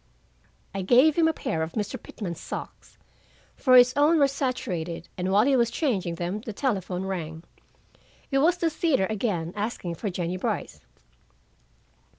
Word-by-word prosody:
I 195 Hz, -, -3 dB
gave 255 Hz, +10 st, +5 dB
him 330 Hz, -1 st, +4 dB
a -, -, +3 dB
pair 165 Hz, -, -3 dB
of 160 Hz, +1 st, -3 dB
Mr. 215 Hz, +3 st, -3 dB
Pitman's 175 Hz, -6 st, -6 dB
socks, -, -, -8 dB, 0.6 s
for 255 Hz, -1 st, +4 dB
his 250 Hz, 0 st, +7 dB
own 295 Hz, +4 st, +4 dB
were 285 Hz, -2 st, +5 dB
saturated, 215 Hz, -, -3 dB
and 185 Hz, +1 st, -2 dB
while 205 Hz, +3 st, +5 dB
he 275 Hz, 0 st, +3 dB
was 235 Hz, -2 st, +3 dB
changing 195 Hz, -, -1 dB
them 180 Hz, +5 st, -3 dB
the 220 Hz, -1 st, -6 dB
telephone 190 Hz, -7 st, -2 dB
rang. 165 Hz, -4 st, -5 dB, 0.9 s
It 270 Hz, -, +3 dB
was 340 Hz, +5 st, +3 dB
the 335 Hz, -2 st, 0 dB
theater 305 Hz, -, +1 dB
again, 190 Hz, -6 st, -2 dB
asking 205 Hz, -4 st, -3 dB
for 200 Hz, +5 st, -4 dB
Jennie 180 Hz, 0 st, -3 dB
Brice. -, -, -3 dB
210 Hz, 160 wpm, -26 LUFS, 180-270 Hz, 0.9 s, his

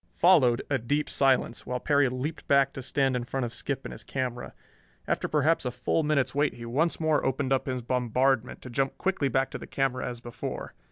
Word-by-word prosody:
Followed 130 Hz, -9 st, +5 dB
a 140 Hz, -2 st, 0 dB
deep 145 Hz, +6 st, 0 dB
silence, 130 Hz, -3 st, +1 dB
while 125 Hz, 0 st, -2 dB
Perry 145 Hz, -1 st, +3 dB
leaped 130 Hz, +6 st, -4 dB
back 140 Hz, -1 st, +4 dB
to 135 Hz, -, -6 dB
stand 135 Hz, 0 st, 0 dB
in 125 Hz, -, -1 dB
front 130 Hz, +1 st, -2 dB
of 115 Hz, -, -6 dB
Skip 140 Hz, +2 st, -3 dB
and -, -, -5 dB
his 110 Hz, -, -9 dB
camera. 125 Hz, +1 st, -4 dB, 0.5 s
After -, -, 0 dB
perhaps 155 Hz, +2 st, +2 dB
a 125 Hz, -, -1 dB
full 125 Hz, -, 0 dB
minute's 140 Hz, -4 st, +1 dB
wait 145 Hz, +1 st, +1 dB
he 115 Hz, -, -8 dB
once 150 Hz, +8 st, 0 dB
more 155 Hz, -2 st, +2 dB
opened 135 Hz, +1 st, 0 dB
up 135 Hz, -, 0 dB
his 130 Hz, -2 st, -2 dB
bombardment, 125 Hz, 0 st, 0 dB
to 125 Hz, -, -8 dB
jump 135 Hz, +2 st, -1 dB
quickly 185 Hz, -7 st, 0 dB
back 135 Hz, +1 st, +1 dB
to -, -, -5 dB
the -, -, -9 dB
camera 135 Hz, -2 st, -1 dB
as 120 Hz, -1 st, -7 dB
before. 120 Hz, 0 st, -6 dB
135 Hz, 215 wpm, -28 LUFS, 125-145 Hz, 0.5 s, Followed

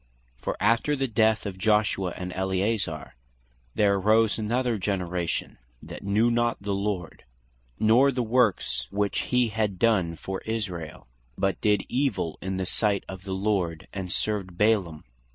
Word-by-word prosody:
For -, -, -4 dB
after 115 Hz, +8 st, +2 dB
the 135 Hz, -1 st, -1 dB
death 110 Hz, -1 st, +2 dB
of 95 Hz, -2 st, -5 dB
Joshua, 105 Hz, -3 st, +1 dB
& -, -, -5 dB
Eleazar, 95 Hz, -3 st, -1 dB, 0.6 s
"there 100 Hz, -1 st, +3 dB
arose 110 Hz, +3 st, +3 dB
another 120 Hz, +1 st, 0 dB
generation" 90 Hz, -6 st, -2 dB, 0.2 s
(Judges -, -, -27 dB
2.10.) -, -, -12 dB
"that -, -, -8 dB
knew 105 Hz, +4 st, +2 dB
not 120 Hz, 0 st, +1 dB
the 100 Hz, 0 st, -3 dB
Lord, 100 Hz, -3 st, -3 dB, 0.6 s
nor 120 Hz, +6 st, +5 dB
the 125 Hz, -2 st, -1 dB
works 110 Hz, -, +1 dB
which 100 Hz, 0 st, 0 dB
he 125 Hz, -2 st, +1 dB
had 105 Hz, -3 st, -1 dB
done 95 Hz, -6 st, +2 dB
for 95 Hz, +3 st, -5 dB
Israel, 95 Hz, -9 st, -4 dB, 0.3 s
but 95 Hz, -3 st, 0 dB
did 105 Hz, -2 st, +2 dB
evill 130 Hz, -, -1 dB
in 95 Hz, 0 st, -3 dB
the 95 Hz, -, -1 dB
sight 100 Hz, +1 st, +1 dB
of 95 Hz, +1 st, -9 dB
the 95 Hz, -1 st, -3 dB
Lord, 95 Hz, -5 st, -1 dB
and 95 Hz, -2 st, -5 dB
served 95 Hz, -4 st, -2 dB
Baalim." 100 Hz, -8 st, +1 dB
100 Hz, 155 wpm, -26 LUFS, 95-110 Hz, 0.6 s, nor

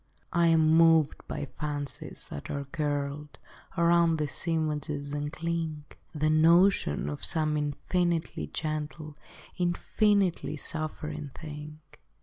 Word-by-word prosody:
I 170 Hz, 0 st, +4 dB
am 160 Hz, -1 st, +4 dB
moved 160 Hz, -1 st, +5 dB
by 145 Hz, -, -4 dB
fancies 145 Hz, 0 st, -4 dB
that 70 Hz, -, -7 dB
are 140 Hz, -1 st, -3 dB
curled 145 Hz, -1 st, -3 dB, 0.4 s
Around 170 Hz, -1 st, +4 dB
these 150 Hz, +2 st, -2 dB
images, 150 Hz, -3 st, -1 dB
and 145 Hz, 0 st, -2 dB
cling: 165 Hz, -1 st, -3 dB, 0.3 s
The 155 Hz, -1 st, 0 dB
notion 165 Hz, -, +4 dB
of 75 Hz, 0 st, -5 dB
some 155 Hz, -2 st, +1 dB
infinitely 160 Hz, -, -1 dB
gentle 155 Hz, -, -4 dB, 0.4 s
Infinitely 180 Hz, 0 st, +1 dB
suffering 150 Hz, -1 st, -4 dB
thing. 150 Hz, 0 st, -8 dB
155 Hz, 110 wpm, -29 LUFS, 150-165 Hz, 0.4 s, moved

